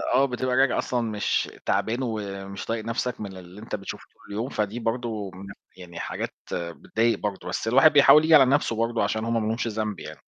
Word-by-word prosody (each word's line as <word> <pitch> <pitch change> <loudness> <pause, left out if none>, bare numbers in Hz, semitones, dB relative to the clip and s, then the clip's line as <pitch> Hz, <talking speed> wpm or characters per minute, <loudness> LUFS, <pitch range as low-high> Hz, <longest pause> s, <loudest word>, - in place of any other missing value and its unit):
آه، 135 - +5
بتبقى 125 -1 -1
راجع 130 -1 +3
أصلًا 125 -1 -1
مش 110 -3 -1 0.2
تعبان 115 +2 0
ومش 100 -4 -5
طايق 115 -1 -3
نفْسك 115 +1 -2
من 95 -2 -6
اللي 90 +3 -12
أنت 110 - -4
بتشوفه 100 -2 -7
طول - - -13
يوم، 120 +5 -2
فدي 105 +2 -2
برضو 115 -4 -3
من 95 +1 -10 0.3
يعني 85 -2 -10
حاجات - - -4 0.2
بتضايق 110 +7 -1
برضو، 105 -2 -4
بس - - -3
الواحد 135 +6 +6
بيحاول 145 +1 +8
ييجي 160 0 +6
على 135 -3 +8
نفْسه 135 -3 +1
برضو 115 +1 0
عشان 110 0 -1
هُم 115 -1 0
ما - - -1
لهمش 115 +1 -1
ذنب 110 -2 -3
يعني. - - -9
115 Hz, 205 wpm, -25 LUFS, 105-125 Hz, 0.3 s, بيحاول